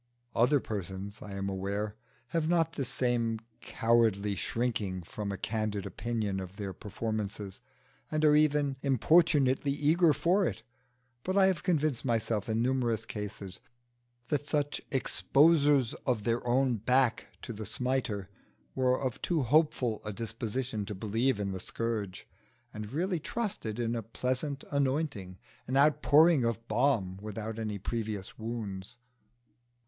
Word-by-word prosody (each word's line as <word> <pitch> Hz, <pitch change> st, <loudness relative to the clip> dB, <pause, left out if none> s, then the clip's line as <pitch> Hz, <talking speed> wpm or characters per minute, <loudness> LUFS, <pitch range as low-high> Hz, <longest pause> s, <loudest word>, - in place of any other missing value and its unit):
Other 125 Hz, +5 st, +4 dB
persons, 100 Hz, -2 st, -5 dB
I 100 Hz, -, -7 dB
am 100 Hz, 0 st, -3 dB
aware, 100 Hz, +2 st, -2 dB, 0.3 s
have 160 Hz, +3 st, 0 dB
not 170 Hz, -2 st, +2 dB
the 135 Hz, -, -2 dB
same 120 Hz, -2 st, 0 dB, 0.2 s
cowardly 110 Hz, -3 st, +2 dB
shrinking 105 Hz, -4 st, -2 dB
from 100 Hz, +4 st, -5 dB
a 100 Hz, -, -4 dB
candid 105 Hz, -3 st, -2 dB
opinion 110 Hz, -4 st, -2 dB
of 95 Hz, 0 st, -7 dB
their 100 Hz, -2 st, -5 dB
performances, 105 Hz, 0 st, -4 dB, 0.5 s
and 155 Hz, 0 st, +1 dB
are 150 Hz, 0 st, +6 dB
even 150 Hz, -2 st, +3 dB
importunately 140 Hz, 0 st, +3 dB
eager 155 Hz, +4 st, +4 dB
for 180 Hz, +6 st, +2 dB
it; 110 Hz, -, -5 dB, 0.6 s
but 185 Hz, +2 st, -1 dB
I 195 Hz, -, +7 dB
have 185 Hz, -4 st, +2 dB
convinced 155 Hz, -8 st, +1 dB
myself 115 Hz, -2 st, 0 dB
in 110 Hz, +1 st, +1 dB
numerous 120 Hz, -3 st, 0 dB
cases 100 Hz, -4 st, -6 dB, 0.7 s
that 145 Hz, -1 st, -1 dB
such 145 Hz, -1 st, 0 dB
exposers 145 Hz, -1 st, +4 dB
of 120 Hz, -5 st, +1 dB
their 115 Hz, +2 st, 0 dB
own 125 Hz, 0 st, +2 dB
back 125 Hz, +2 st, +2 dB, 0.2 s
to 120 Hz, -, -5 dB
the 105 Hz, -1 st, -6 dB
smiter 115 Hz, -3 st, -1 dB, 0.5 s
were 130 Hz, -1 st, +2 dB
of 130 Hz, -3 st, -3 dB
too 165 Hz, -5 st, +1 dB
hopeful 130 Hz, -4 st, +2 dB
a 105 Hz, -, -4 dB
disposition 115 Hz, +1 st, -3 dB
to 105 Hz, -, -4 dB
believe 110 Hz, +4 st, 0 dB
in 100 Hz, -1 st, -1 dB
the 95 Hz, -, -4 dB
scourge, 105 Hz, -2 st, -4 dB, 0.5 s
and 105 Hz, 0 st, -6 dB
really 175 Hz, +4 st, 0 dB
trusted 195 Hz, -, -3 dB
in 120 Hz, -1 st, -1 dB
a 115 Hz, -, -2 dB
pleasant 130 Hz, +5 st, -3 dB
anointing, 135 Hz, -, -1 dB, 0.3 s
an 130 Hz, +2 st, 0 dB
outpouring 150 Hz, +1 st, +5 dB
of 115 Hz, 0 st, -2 dB
balm 110 Hz, -6 st, +1 dB
without 110 Hz, +1 st, -5 dB
any 105 Hz, -2 st, -3 dB
previous 105 Hz, -1 st, -4 dB
wounds. 110 Hz, -2 st, -5 dB
115 Hz, 140 wpm, -30 LUFS, 105-140 Hz, 0.7 s, I